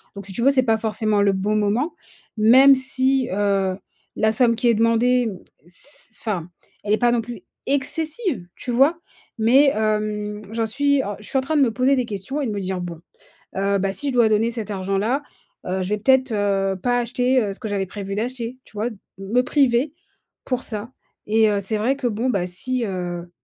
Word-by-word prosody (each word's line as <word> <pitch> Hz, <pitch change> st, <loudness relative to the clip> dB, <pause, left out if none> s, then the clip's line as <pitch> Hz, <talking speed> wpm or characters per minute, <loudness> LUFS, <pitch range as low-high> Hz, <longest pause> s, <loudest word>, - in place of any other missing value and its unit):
donc 200 Hz, -1 st, -8 dB
si 195 Hz, -, -7 dB
tu 235 Hz, -, -3 dB
veux 265 Hz, -, +5 dB
c'est 260 Hz, -2 st, +3 dB
pas 225 Hz, -3 st, +2 dB
forcément 215 Hz, -1 st, 0 dB
le 200 Hz, -1 st, +3 dB
bon 200 Hz, +3 st, 0 dB
moment 215 Hz, +10 st, 0 dB, 0.4 s
même 255 Hz, +6 st, +7 dB
si, 260 Hz, -1 st, +1 dB
heu, 195 Hz, -1 st, +1 dB, 0.4 s
la 220 Hz, 0 st, +2 dB
somme 230 Hz, +1 st, +3 dB
qui 240 Hz, -, 0 dB
est 235 Hz, -, +5 dB
demandée, 230 Hz, +3 st, +3 dB
m 195 Hz, -, -7 dB, 0.3 s
c 220 Hz, +5 st, -5 dB
enfin 180 Hz, -6 st, -3 dB, 0.3 s
elle 210 Hz, -, 0 dB
est -, -, +4 dB
pas 240 Hz, 0 st, +3 dB
non 240 Hz, -1 st, +1 dB
plus 230 Hz, -3 st, -8 dB, 0.3 s
excessive, 305 Hz, -, -1 dB
tu 250 Hz, -, -5 dB
vois? 275 Hz, +8 st, +3 dB, 0.4 s
Mais 265 Hz, +6 st, +5 dB
hem, 210 Hz, -1 st, -1 dB
j'en 225 Hz, 0 st, -1 dB
suis 280 Hz, +4 st, +2 dB
alors 205 Hz, -5 st, -4 dB
je 210 Hz, -, -10 dB
suis -, -, -1 dB
en -, -, +3 dB
train 310 Hz, +4 st, -2 dB
de -, -, +4 dB
me 250 Hz, -4 st, +3 dB
poser 255 Hz, +4 st, +2 dB
des 255 Hz, -2 st, 0 dB
questions 220 Hz, +7 st, -4 dB
et -, -, -1 dB
de 225 Hz, -, -2 dB
me 205 Hz, -, -3 dB
dire: 185 Hz, -1 st, -3 dB
«Bon, 170 Hz, -2 st, -6 dB, 0.6 s
heu, 200 Hz, +1 st, +1 dB
bah 195 Hz, 0 st, -1 dB
si 290 Hz, -, -3 dB
je 275 Hz, -, -1 dB
dois 235 Hz, -3 st, +4 dB
donner 215 Hz, +2 st, +2 dB
cet 225 Hz, -3 st, -5 dB
argent-là, 195 Hz, +7 st, -1 dB, 0.5 s
heu, 190 Hz, +1 st, -1 dB
je 185 Hz, -, -4 dB
vais 210 Hz, -, 0 dB
peut-être, 260 Hz, +3 st, +3 dB
heu, 195 Hz, -2 st, 0 dB
pas 245 Hz, +5 st, +1 dB
acheter, 250 Hz, +2 st, +1 dB
heu, 200 Hz, -2 st, -3 dB
ce -, -, -11 dB
que 225 Hz, -, -5 dB
j'avais 200 Hz, -2 st, -1 dB
prévu 195 Hz, +1 st, -6 dB
d'acheter». 240 Hz, +2 st, -4 dB
Tu -, -, -20 dB
vois? 215 Hz, +3 st, -2 dB
De 220 Hz, -, -11 dB, 0.2 s
me 205 Hz, +6 st, +1 dB
priver 270 Hz, 0 st, +2 dB, 0.5 s
pour 255 Hz, -1 st, -2 dB
ça 220 Hz, +1 st, -5 dB, 0.4 s
et 220 Hz, +1 st, +4 dB
heu, 205 Hz, -, +1 dB
c'est 205 Hz, +3 st, -1 dB
vrai 240 Hz, +6 st, +1 dB
que 270 Hz, -3 st, -1 dB
bon 235 Hz, +3 st, -1 dB
bah 190 Hz, -7 st, 0 dB
si, 250 Hz, +8 st, -2 dB
heu, 175 Hz, -3 st, -4 dB
220 Hz, 220 wpm, -22 LUFS, 200-255 Hz, 0.6 s, même